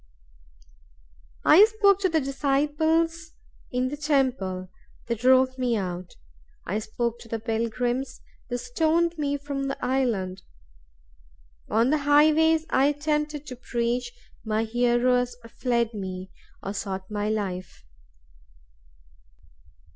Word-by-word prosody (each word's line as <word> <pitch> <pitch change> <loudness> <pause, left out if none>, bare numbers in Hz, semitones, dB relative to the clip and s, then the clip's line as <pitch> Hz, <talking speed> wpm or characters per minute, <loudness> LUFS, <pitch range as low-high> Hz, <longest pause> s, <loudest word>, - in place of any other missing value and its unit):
I 370 +7 +8
spoke 415 -3 +3
to 380 -2 +1
the 320 -1 +2
disciples 310 +4 0 0.4
in 250 +1 0
the 295 - -5
temple; 255 - 0 0.4
they 235 - -1
drove 260 +2 +3
me 245 -3 +1
out. 180 -2 -5 0.5
I 205 +5 -1
spoke 235 +2 -3
to - - -13
the 230 - -3
pilgrims; 240 +3 -2 0.3
they 245 - -1
stoned 320 +7 +1
me 285 -1 0
from 280 -1 -4
the 275 - -3
island. 215 -8 -1 1.3
On 235 +4 +3
the 305 - +2
highways 310 +2 +4
I 270 +2 +4
attempted 300 0 -1
to 255 - -7
preach; 240 - -2 0.3
my 220 0 0
hearers 245 +1 +1 0.2
fled 235 -2 +1
from 210 -3 -6
me, 185 0 -6 0.3
or 195 - -4
sought 190 -1 -5
my 210 0 -1
life. 185 - -4
250 Hz, 115 wpm, -26 LUFS, 220-295 Hz, 1.3 s, I